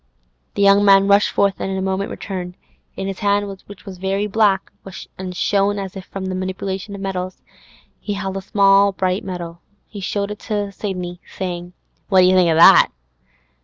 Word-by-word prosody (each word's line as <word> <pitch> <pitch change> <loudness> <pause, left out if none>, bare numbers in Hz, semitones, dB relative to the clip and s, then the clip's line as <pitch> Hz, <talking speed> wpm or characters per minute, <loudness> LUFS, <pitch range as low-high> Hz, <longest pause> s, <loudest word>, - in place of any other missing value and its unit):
The 200 - +1
young 200 +1 +5
man 195 -1 +6
rushed 200 +1 +4
forth, 200 -3 +1
and - - -3
in 190 - -2
a - - -2
moment 190 +1 -2
returned. 180 -2 -6 0.4
In 195 - -4
his 195 -1 -5
hand, 205 -1 +1 0.2
which 200 -1 -13
was 190 -3 -9
very 195 +2 -1
black, 205 -2 +1 0.4
and 185 -1 -7
shone 200 +2 +1
as 195 -1 -6
if 190 -1 -8
from 195 -1 -7
the 190 - -3
manipulation 190 +2 -4
of 195 - -8
metals, 185 -1 -5 0.6
he 205 - -4
held 195 -1 -4
a 195 - -3
small 200 0 +4
bright 185 +1 -1
medal. 175 -2 -7 0.2
He 205 - -10
showed 200 +1 -3
it 210 - -7
to 205 -3 -3
Sidney, 180 -3 -5 0.2
saying, 175 -1 -5 0.4
'What 190 -3 +5
d'you 185 +1 +5
think 180 -2 +4
o' 160 - +2
that? 165 - +7
195 Hz, 190 wpm, -20 LUFS, 185-200 Hz, 0.6 s, that